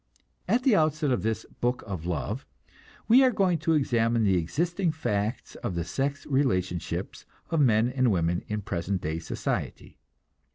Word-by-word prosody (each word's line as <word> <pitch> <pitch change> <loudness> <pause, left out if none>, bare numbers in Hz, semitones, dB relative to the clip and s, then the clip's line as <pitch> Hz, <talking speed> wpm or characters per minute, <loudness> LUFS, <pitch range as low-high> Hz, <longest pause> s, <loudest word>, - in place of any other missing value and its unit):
At 250 +2 +2
the 255 -5 +5
outset 155 -3 +2
of 125 - +1
this 110 +2 -2
Book 125 +1 0
of 90 -5 -5
Love 100 - -3 0.6
we 250 +4 +7
are 260 - +6
going 190 -7 +1
to 160 +2 +1
examine 115 -5 +2
the 95 -3 +3
existing 170 - 0
facts 110 -7 -2
of 90 - -4
the 85 - -1
sex 140 - -2
relationships 95 - -1 0.2
of 165 - +2
men 115 -3 +4
and 130 0 +1
women 85 -1 0
in 105 -1 -3
present 95 -1 -2
day 80 +2 -2
society. 80 - -4
120 Hz, 160 wpm, -27 LUFS, 95-155 Hz, 0.6 s, we